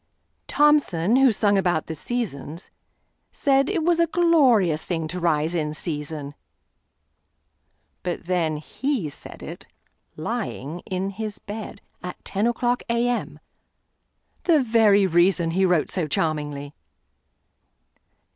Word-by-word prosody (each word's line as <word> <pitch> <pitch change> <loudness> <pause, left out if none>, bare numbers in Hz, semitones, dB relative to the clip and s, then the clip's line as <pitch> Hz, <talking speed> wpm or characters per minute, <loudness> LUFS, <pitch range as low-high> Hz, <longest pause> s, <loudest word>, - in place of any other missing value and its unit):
Thomson, 260 - +3
who 265 -2 +6
sung 205 -1 +3
about 175 -4 0
the 160 - -5
"Seasons," 170 - -4 0.6
saidIt 280 +6 +1
was 345 -1 +3
a 335 - +4
glorious 260 - +3
thing 165 -3 -2
to 180 +2 -4
rise 160 -1 +1
in 155 -3 -2
season; 150 -3 -5 1.7
But 175 -2 -4
then 170 -4 0
he 235 - -3
said - - -11
it—lying—in 180 +6 -6
his 210 +1 -5
bed, 205 -1 -8 0.2
At 180 0 -8
ten 205 +3 0
o'clock 240 +1 0
A.M.,—the 245 +5 -3
very 220 -4 +4
reasonHe 175 +1 +3
wrote 175 -4 +1
so 175 -5 -1
charmingly. 145 -2 -2
185 Hz, 100 wpm, -24 LUFS, 160-240 Hz, 1.7 s, who